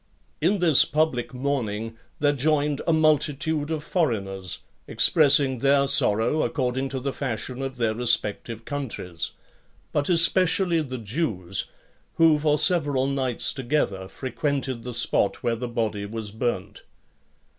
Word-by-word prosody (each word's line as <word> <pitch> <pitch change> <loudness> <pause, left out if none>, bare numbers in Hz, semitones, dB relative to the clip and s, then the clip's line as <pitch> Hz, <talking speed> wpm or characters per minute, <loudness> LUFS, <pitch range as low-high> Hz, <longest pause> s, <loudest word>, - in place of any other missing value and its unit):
In 205 - +2
this 170 -6 +5
public 150 -5 -1
mourning 115 -5 -3 0.2
there 145 0 +2
joined 145 0 0
a - - +3
multitude 155 -1 +1
of 155 -2 -3
foreigners, 100 - -2 0.3
expressing 140 -4 +4
their 140 +1 +3
sorrow 115 +5 +3
according 130 -1 -2
to 130 0 -4
the 135 +1 -4
fashion 130 0 -4
of 135 -1 -5
their 115 -2 0
respective 115 -1 0
countries; 110 - -5 0.6
but 145 +2 -1
especially 175 0 +4
the 130 -4 -6
Jews, 105 - -3 0.5
who 160 -2 +4
for 150 0 +1
several 145 -5 +2
nights 135 -3 -1
together 120 -8 -2
frequented 130 0 -3
the 125 - -6
spot - - +1
where 115 - 0
the 125 +2 -5
body 110 -4 -3
was 110 -1 -5
burnt. 120 +3 -4
135 Hz, 130 wpm, -24 LUFS, 115-150 Hz, 0.6 s, this